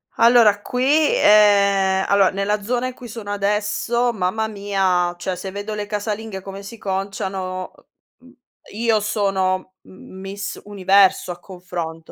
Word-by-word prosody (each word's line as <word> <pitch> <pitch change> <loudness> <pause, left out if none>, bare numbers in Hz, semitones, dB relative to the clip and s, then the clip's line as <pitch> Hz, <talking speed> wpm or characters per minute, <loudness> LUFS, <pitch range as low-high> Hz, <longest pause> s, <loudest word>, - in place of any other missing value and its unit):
Allora 230 -3 +5
qui 250 +4 -3 0.3
ehm, 200 -2 +4
allora 200 -1 +4
nella 200 +2 -1
zona 245 +4 -1
in 255 - -6
cui 245 0 -11
sono 215 -2 -7
adesso, 210 +4 0
mamma 220 +1 -1
mia, 195 -4 0
cioè, 180 +1 -3
se 190 - -6
vedo 205 +2 -5
le 210 -1 -4
casalinghe 210 -1 -4
come 195 +1 -8
si 215 +4 -10
conciano, 190 -2 -4 0.5
uhm, 255 - -21
mhmm, 255 - -18 0.4
io 225 0 +1
sono 190 -3 -1
m 185 0 -14
Miss 200 +1 -6
Universo 195 -2 +3
a 175 - -8
confronto. 175 -3 -7
200 Hz, 145 wpm, -21 LUFS, 190-215 Hz, 0.5 s, Allora